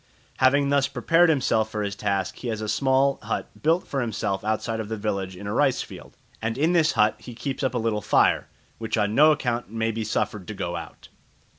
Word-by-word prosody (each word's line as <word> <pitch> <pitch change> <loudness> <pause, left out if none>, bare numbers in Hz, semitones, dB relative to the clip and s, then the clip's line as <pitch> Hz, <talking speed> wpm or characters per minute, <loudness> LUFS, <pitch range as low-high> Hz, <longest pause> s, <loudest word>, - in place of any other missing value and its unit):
Having 140 +2 +3
thus 140 -1 +3
prepared 165 +7 +3
himself 115 -7 +2
for 105 -1 -3
his 100 -1 -3
task 100 -3 -2
he 125 - -6
has 110 -2 -2
a 110 - -4
small 135 +4 +2
hut - - -3
built 165 +4 +2
for 135 - -2
himself 105 -4 -2
outside 110 +1 -1
of 110 -1 -5
the 110 - -3
village 100 -3 -3
in 100 - -9
a 100 - -3
rice - - +2
field, - - -12 0.2
and 115 +1 -2
in 160 +5 +2
this 160 -3 +3
hut 105 0 +3
he 120 - -10
keeps 135 +2 -4
up 130 -3 -1
a - - +2
little 110 -2 -1
fire, - - +3 0.3
which 115 0 -2
on 105 -1 +1
no 155 +5 +6
account 125 -7 -1
may 115 +1 -1
be 110 0 -3
suffered 105 -2 -2
to 110 - -6
go 85 -2 -3
out. 85 - -9
115 Hz, 225 wpm, -25 LUFS, 105-135 Hz, 0.3 s, no